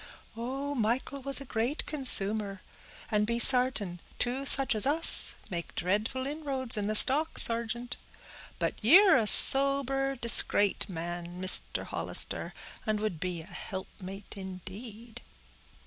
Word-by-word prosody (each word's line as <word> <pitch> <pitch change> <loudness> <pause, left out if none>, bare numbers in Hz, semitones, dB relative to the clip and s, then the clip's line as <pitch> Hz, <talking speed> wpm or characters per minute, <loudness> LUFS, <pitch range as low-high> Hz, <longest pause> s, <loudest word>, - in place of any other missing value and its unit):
"Oh! 270 +5 -6
Michael 250 +3 -3
was 275 0 -1
a 275 - -10
great 245 +5 -4
consumer, 210 -8 +3 0.5
and 210 -1 0
be 235 0 -2
sartin; 245 -8 0 0.2
two 260 +3 -3
such 270 -1 +5
as 215 +4 +2
us 320 +4 +5 0.2
make 170 -1 -7
dreadful 210 +8 -3
inroads 275 -4 -1
in 205 -1 -3
the 215 - -2
stock, 290 +8 +3
sargeant. 235 +1 -2 0.6
But - - -2
ye're 375 - +6
a 225 -4 +1
sober, 275 +1 +4
discrate 215 -5 +2
man, 175 0 -8
Mister 185 0 0
Hollister, - - -6 0.3
and 215 -2 -3
would 210 -7 -4
be 175 -2 -5
a - - -16
helpmate 190 +2 -10
indeed." 205 +4 -10
230 Hz, 130 wpm, -28 LUFS, 200-270 Hz, 0.6 s, ye're